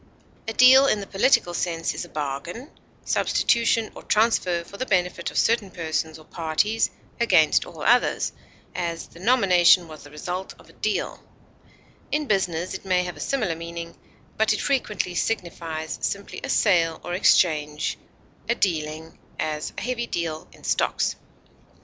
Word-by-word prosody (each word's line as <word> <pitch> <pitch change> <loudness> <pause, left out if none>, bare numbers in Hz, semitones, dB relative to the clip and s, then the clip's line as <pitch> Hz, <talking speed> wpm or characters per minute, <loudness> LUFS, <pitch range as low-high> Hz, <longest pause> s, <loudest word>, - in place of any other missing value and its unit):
A 225 - -2
deal 260 +3 +7
in 215 - +2
the 200 - -5
political 195 -3 +2
sense 165 -1 -1
is - - -5
a - - -15
bargain, 155 - -5 0.3
substitution, 230 -2 +2
or - - -10
transfer 200 -6 +2
for 200 - -12
the 255 - -2
benefit 180 -3 0
of - - -7
certain 225 -4 +2
persons 160 -2 -3
or 155 - -16
parties 170 +9 0 0.3
against 180 -10 +4
all 160 -3 -9
others; 245 +2 +3 0.4
as, 170 -1 -3
the 165 - -15
nomination 185 -6 +5
was 155 -1 -11
the 145 - -13
result 180 +5 -5
of - - -19
a - - -18
deal; - - -2 0.9
in 300 0 0
business 185 - 0
it 190 - -6
may 185 -2 +1
have 180 -1 -5
a - - -12
similar 215 -12 -1
meaning, 170 0 -7 0.4
but 220 0 +3
it 215 - -3
frequently 220 -9 -1
signifies 170 -5 -3
simply 200 0 -4
a - - -4
sale 165 -6 +3
or 175 - -5
exchange, 150 -5 +2 0.5
a 235 - +3
dealing; 160 -5 -2 0.2
as, 155 -1 -2
a - - -4
heavy 240 -1 -2
deal 160 -5 -3
in - - -19
stocks. - - 0
180 Hz, 155 wpm, -24 LUFS, 165-215 Hz, 0.9 s, deal